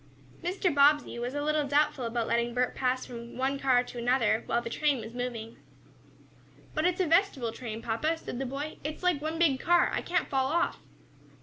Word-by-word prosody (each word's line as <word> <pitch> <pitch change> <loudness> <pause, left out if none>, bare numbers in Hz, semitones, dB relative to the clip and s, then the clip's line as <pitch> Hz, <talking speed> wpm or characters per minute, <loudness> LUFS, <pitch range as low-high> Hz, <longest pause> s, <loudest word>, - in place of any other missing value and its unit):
Mr. 360 -1 0
Bobbsey 285 -3 +4
was 245 +3 -3
a 290 - -1
little 305 -1 +1
doubtful 290 -2 +2
about 230 0 -1
letting 235 +1 0
Bert 250 0 +1
pass 255 0 0
from 235 -1 -9
one 270 +2 0
car 255 -2 +3
to 245 - -8
another 235 -2 +2
when 235 +1 0
the - - -4
train 290 -2 +1
was 225 +1 -8
moving. 240 -2 -5 1.2
"But 310 - 0
it's 360 0 -1
a - - +2
vestibule 325 - +2
train, 225 -1 -7
papa," 305 +9 0
said 255 - -6
the 270 - -2
boy. 285 +4 -5
"It's 305 +4 -5
like 355 -5 +2
one 315 +2 -3
big 305 -6 +3
car. 350 +3 +3
I - - 0
can't 360 +1 0
fall 265 -1 +1
off." 340 +5 0
270 Hz, 200 wpm, -29 LUFS, 240-305 Hz, 1.2 s, Bobbsey